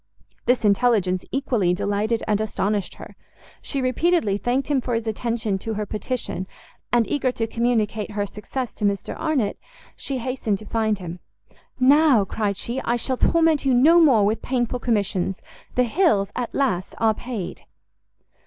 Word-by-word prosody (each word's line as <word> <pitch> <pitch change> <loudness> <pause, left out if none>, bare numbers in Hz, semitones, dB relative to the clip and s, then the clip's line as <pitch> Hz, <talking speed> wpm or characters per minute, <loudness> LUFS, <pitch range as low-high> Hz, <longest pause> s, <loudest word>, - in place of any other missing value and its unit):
This 245 -2 +2
intelligence 200 -4 +2
equally 240 -10 +1
delighted 205 +3 -1
and 210 -1 +1
astonished 205 -2 -1
her; - - -11 0.5
she 275 -2 -2
repeatedly 275 - +2
thanked 245 +6 -1
him 285 -3 +1
for 245 -1 -2
his 230 0 -2
attention 220 -2 -2
to 220 +2 -4
her 210 0 -2
petition, 215 -3 -4 0.4
and, 240 -2 +3
eager 265 -3 0
to 225 - -1
communicate 225 -2 0
her 205 -1 -1
success 225 +5 -5
to - - -8
Mr 200 -1 -1
Arnott, 280 -10 -1 0.4
she 275 - -4
hastened 250 -4 -2
to 215 - -11
find 220 -1 0
him. 175 -2 -7 0.6
"Now," 270 -4 +5
cried 200 0 -2
she, 240 +5 -3
"I 235 - 0
shall 255 +2 -1
torment 325 -1 +3
you 265 -2 +3
no 315 +8 +6
more 245 -10 +5
with 215 +2 0
painful 250 -1 -1
commissions; 200 -5 -1 0.4
the 250 - +4
Hills, 240 - +2
at 245 -2 -3
last, 200 -10 0
are 225 -1 +3
paid!" 225 -5 -6
230 Hz, 160 wpm, -23 LUFS, 205-255 Hz, 0.6 s, no